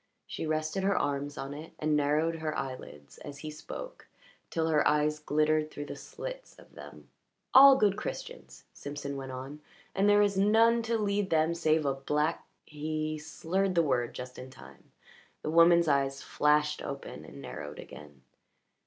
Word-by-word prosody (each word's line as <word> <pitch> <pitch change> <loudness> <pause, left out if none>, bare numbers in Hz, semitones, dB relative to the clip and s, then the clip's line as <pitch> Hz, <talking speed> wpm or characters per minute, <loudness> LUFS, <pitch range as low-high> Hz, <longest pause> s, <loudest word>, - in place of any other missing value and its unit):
She 160 - -5
rested 155 +4 -1
her 195 0 +1
arms 145 0 -2
on 135 +1 -5
it, 155 +3 -9
and 155 0 0
narrowed 150 +3 +1
her 155 -1 -3
eyelids 130 - -7
as 145 -1 -9
he 155 +1 -7
spoke 160 - -9 0.4
till 160 -1 -1
her 155 -2 +3
eyes 150 0 +2
glittered 155 +1 +1
through 145 -1 -7
the - - -7
slits - - -8
of - - -18
them. - - -12 0.4
"All 275 +1 +10
good 205 -4 +2
Christians," - - -7
Simpson 145 -1 -6
went 135 -1 -6
on; 135 +4 -8 0.3
"and 195 +1 +2
there 205 0 +6
is 200 -1 +1
none 225 +3 +4
to 230 - +2
lead 205 -2 0
them 160 +1 +2
save 160 -2 +1
a 140 - +2
black 150 +4 -1 0.2
" - - -52
He 155 +1 -3
slurred 180 +5 -2
the 170 - +4
word 125 -5 0
just 125 0 -8
in 130 +1 -9
time. 130 - -16 0.5
The 155 - -2
woman's 170 +1 +6
eyes 135 -1 +1
flashed 150 0 +1
open 140 - -7
and 70 -2 -12
narrowed - - -8
again. 75 -3 -12
155 Hz, 170 wpm, -30 LUFS, 145-170 Hz, 0.5 s, All